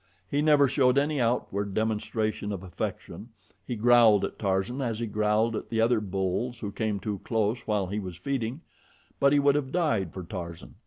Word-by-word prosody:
He 145 - 0
never 150 -2 +5
showed 130 -1 +3
any 145 -1 +1
outward 100 -4 -1
demonstration 110 -1 -1
of 95 -2 -5
affection 95 +5 -6 0.4
he 125 - -2
growled 115 -2 +5
at - - -8
Tarzan 100 +6 -1
as 115 -4 -2
he 120 - -1
growled 105 +1 +1
at - - -5
the 115 - -1
other 115 0 +3
bulls 100 +5 -2
who 100 - -4
came 105 -1 -2
too 100 -1 -4
close 110 +1 0
while 105 -3 +1
he 100 +3 -3
was 90 -4 -7
feeding 130 - -3 0.6
but 140 - +4
he 145 - +4
would 140 0 +4
have 140 -2 -1
died 140 - 0
for 95 - -7
Tarzan. 85 -2 -7
110 Hz, 190 wpm, -27 LUFS, 100-125 Hz, 0.6 s, never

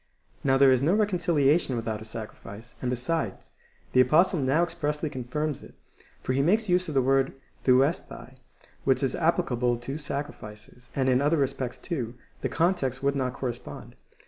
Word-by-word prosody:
Now 135 -1 +3
there 135 -1 +6
is 130 -1 +3
no 165 +8 +3
reconciliation 170 - +2
without 110 -2 -3
a - - -8
sacrifice; 110 0 -9
and, 125 - -1
besides, 125 - -3 0.4
the 130 - +7
Apostle 160 +7 +4
now 140 +5 +2
expressly 150 -3 -2
confirms 145 +3 -3
it, - - -14 0.5
for 130 - -1
he 135 - +2
makes 215 +9 +2
use 180 0 +2
of 155 - -5
the 135 - +4
word 135 0 +1 0.3
OvecrOaL, 130 0 +1 0.5
which 130 0 +2
is 130 - 0
applicable 135 -8 +1
to 135 +5 -5
sacrifices, 125 -5 -7
and 130 -1 +1
in 130 0 +3
other 150 +3 +2
respects, 135 -3 -1
too, 125 -9 -4 0.3
the - - -1
con 170 +3 +2
text 135 -6 -4
would 140 0 +2
not 130 -2 -1
correspond. 125 -2 -6
135 Hz, 170 wpm, -27 LUFS, 125-155 Hz, 0.5 s, the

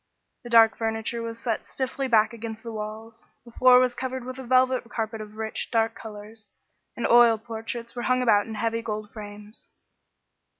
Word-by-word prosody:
The 240 - -9
dark 225 -1 +6
furniture 225 +1 -2
was 230 0 -5
set 230 -1 -2
stiffly 265 +1 -3
back 225 -2 +3
against 225 -1 -7
the 230 - -6
walls, 220 +1 -7 0.2
the 235 - -13
floor 255 +1 +6
was 250 -1 +2
covered 260 0 -4
with 255 +1 -7
a - - -6
velvet 255 -1 +2
carpet 225 -2 -4
of 215 0 -10
rich, 220 0 -4
dark 225 -1 +1
colors, 215 0 -11 0.5
and 240 - -2
oil 235 -1 +6
portraits 230 +1 -7
were 240 - -3
hung 255 0 +3
about 210 -3 +3
in 220 - -6
heavy 230 +1 -1
gold 215 -2 -5
frames. 210 0 -10
230 Hz, 180 wpm, -25 LUFS, 220-240 Hz, 0.5 s, dark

